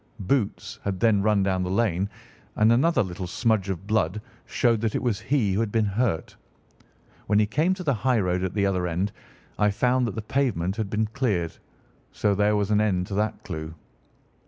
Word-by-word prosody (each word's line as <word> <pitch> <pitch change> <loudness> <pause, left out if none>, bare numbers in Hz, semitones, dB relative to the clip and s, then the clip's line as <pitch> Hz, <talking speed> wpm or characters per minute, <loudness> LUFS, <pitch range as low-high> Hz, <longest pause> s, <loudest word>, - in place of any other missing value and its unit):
Boots 105 +2 -1
had 95 -2 -2
then 110 -4 +3
run 105 -1 +2
down 95 -1 0
the 90 - -2
lane, 95 -2 +1 0.5
and 110 +1 +4
another 135 +2 +3
little 90 0 -5
smudge 110 0 0
of 95 0 -4
blood 105 -2 0 0.3
showed 115 -3 +1
that 115 -2 -1
it - - -1
was 115 -5 0
he 120 -9 +1
who 100 - 0
had 115 -2 -1
been 110 -1 +2
hurt. 100 -3 -1 0.9
When 105 - +3
he 105 - +4
came 155 - +1
to 185 - -7
the 145 -5 +2
highroad 105 -7 +1
at 95 +1 -3
the 100 -1 +2
other 90 -2 0
end, 90 +4 -1 0.5
I 105 0 +4
found 125 +4 +1
that 105 - -5
the 110 - -4
pavement 105 -8 0
had 110 -3 -2
been 110 +1 0
cleared, 105 -8 -1 0.6
so 105 -1 +1
there 105 +1 +2
was 105 0 0
an 105 0 +4
end 95 -4 +1
to - - -5
that 105 +2 -1
clue. 80 -4 -6
105 Hz, 200 wpm, -25 LUFS, 95-115 Hz, 0.9 s, and